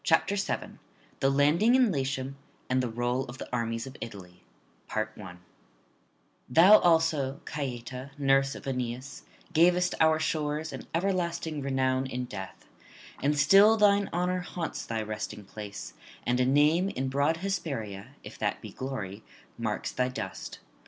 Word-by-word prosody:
BOOK 165 +4 +3
SEVENTH 195 - -3 0.4
THE 135 - +3
LANDING 150 - +4
IN 255 -5 +4
LATIUM, 135 -2 -2 0.4
AND 130 0 +3
THE 125 - -2
ROLL 120 +3 -1
OF 120 0 -9
THE - - -7
ARMIES 115 -1 -1
OF 135 0 -10
ITALY 90 -5 -9 2.1
Thou 180 +11 +8
also, 160 -5 +2
Caieta, 130 -2 -5
nurse 135 -1 +3
of - - -10
Aeneas, 125 0 -4 0.3
gavest 180 +2 +4
our 160 0 +5
shores 155 -1 -1
an 130 - -8
everlasting 170 -4 -1
renown 130 -1 0
in 125 -1 -3
death; 95 -5 -8 0.6
and 145 +1 +1
still 195 +9 +7
thine 200 -1 +4
honour 180 +1 0
haunts 175 -2 -4
thy 110 -1 -2
resting 105 -1 -5
place, 105 0 -8 0.3
and 125 +1 +1
a 125 - +3
name 150 +7 +4
in 135 -7 -3
broad 140 +4 +1
Hesperia, 140 - -4
if - - -10
that - - -1
be - - -9
glory, 110 -7 -5 0.3
marks - - -3
thy 125 - 0
dust. 110 -7 -6
135 Hz, 140 wpm, -29 LUFS, 125-165 Hz, 2.1 s, Thou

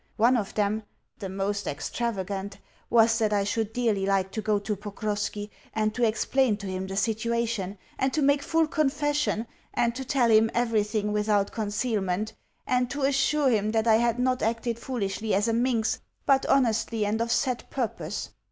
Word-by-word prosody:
One 235 +4 +5
of 215 -3 -2
them 210 +1 +1 0.4
the 195 -3 -5
most 200 +2 -2
extravagant 200 +3 -3 0.3
was 225 0 +4
that 215 -2 +2
I 205 -1 +2
should 220 +1 -1
dearly 220 -5 0
like 195 -1 +1
to 220 - -3
go 215 -1 +1
to 205 +1 -2
Pokrovski, 205 0 -4 0.2
and 215 -1 +1
to 245 - -1
explain 230 +1 +2
to 205 - -8
him 190 0 -3
the 195 0 -5
situation, 225 -2 -1 0.2
and 265 0 +2
to 305 - +2
make 285 +1 +4
full 325 +2 +2
confession, 290 -5 0 0.3
and 235 0 +2
to 265 +2 -5
tell 255 -3 +2
him 220 +1 +5
everything 215 -3 +1
without 210 -1 +1
concealment, 210 -2 -1 0.3
and 250 -1 +1
to 285 +1 -3
assure 275 0 +3
him 215 -1 +1
that 220 0 +2
I 220 -1 +5
had 235 0 +1
not 255 0 +1
acted 230 +1 -1
foolishly 220 -4 -2
as 205 +3 +2
a 230 - +1
minx, 235 -1 +1 0.3
but 270 -1 +3
honestly 225 -4 +2
and 215 +2 0
of 230 0 -1
set 250 -2 0
purpose. 205 - -3
220 Hz, 175 wpm, -27 LUFS, 205-245 Hz, 0.4 s, One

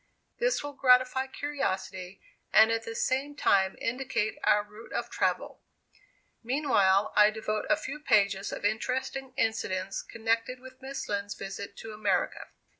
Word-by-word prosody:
This - - +1
will 290 0 -5
gratify 255 0 +4
curiosity, 190 -10 -4 0.3
and 220 +1 +7
at 225 0 -1
the 225 - -6
same 275 +5 0
time 190 -8 +2
indicate 235 -3 -2
our 210 0 +4
route 210 +2 -14
of - - -3
travel. - - -1 0.8
Meanwhile, 220 -7 +2
I 210 0 +7
devote 215 0 -3
a 305 - +4
few 300 -1 -6
pages 200 -7 +2
to 205 - -1
interesting 260 +4 -2
incidents 195 -4 -1
connected 230 +2 -1
with 260 +1 -14
Miss 270 +1 -5
Lind's 205 0 -2
visit 195 +1 -7
to 220 -1 -8
America. 205 -4 -1
225 Hz, 140 wpm, -29 LUFS, 205-265 Hz, 0.8 s, and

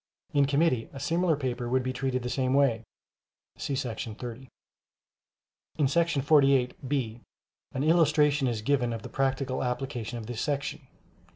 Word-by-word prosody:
In 140 -1 +4
committee 140 -4 +1
a 135 - -7
similar 165 +3 +1
paper 125 -3 -3
would 130 +1 +2
be 130 0 -2
treated 130 -1 -1
the 125 - -3
same 130 -1 +1
way 130 -6 +3 0.7
[see 150 -2 -4
§ 115 -4 -4
30]. 125 +2 -7 1.3
In 150 - +3
§ 165 0 +1
48 135 -3 +3
(b) 120 -5 -2 0.5
an 130 - -1
illustration 150 -3 +4
is 115 -3 -2
given 125 -2 +1
of 115 -2 -6
the - - -7
practical 135 -1 -1
application 125 -2 -3
of 115 - -6
this 120 0 -4
section. 140 -1 -3
135 Hz, 155 wpm, -28 LUFS, 125-145 Hz, 1.3 s, In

